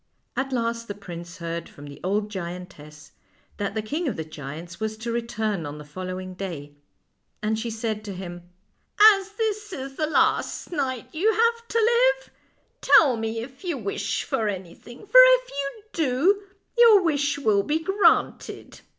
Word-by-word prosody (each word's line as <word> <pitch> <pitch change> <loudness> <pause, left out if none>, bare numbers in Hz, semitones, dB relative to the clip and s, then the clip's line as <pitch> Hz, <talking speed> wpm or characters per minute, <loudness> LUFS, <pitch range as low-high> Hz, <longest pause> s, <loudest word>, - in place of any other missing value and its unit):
At 270 0 -2
last 230 -2 -2
the 205 - -5
prince 175 -2 -9
heard 170 -1 -5
from 145 - -13
the 145 -1 -10
old 205 +3 -1
giantess 170 -5 -8 0.5
that 200 0 -3
the 220 - -1
king 305 +10 -2
of 260 - -1
the 160 - -5
giants 155 +3 -8
was 220 0 -3
to 235 +1 -4
return 220 -5 -2
on 145 0 -6
the 150 - -9
following 185 +4 -6
day, 170 -7 -6 0.7
and 215 +1 0
she 235 +1 -3
said 220 -1 -3
to 200 - -5
him: 175 -1 -7 0.4
" - - -29
As 390 0 -5
this 425 -1 -2
is 270 -5 -7
the 310 - 0
last 315 - +1
night 265 -6 -2
you 385 +8 +2
have 465 +1 +1
to 460 - -2
live, 485 +2 +3 0.5
tell 280 -7 +6
me 225 0 -3
if 260 +6 -11
you 345 -6 -2
wish 205 -2 -2
for 220 - -1
anything, 200 - -7
for - - +7
if - - +5
you 280 +9 -5
do 330 +7 +2 0.4
your 440 -5 +8
wish 290 -4 +1
will 215 -8 +2
be 295 +9 0
granted." 385 +5 +1
230 Hz, 170 wpm, -25 LUFS, -, 0.7 s, your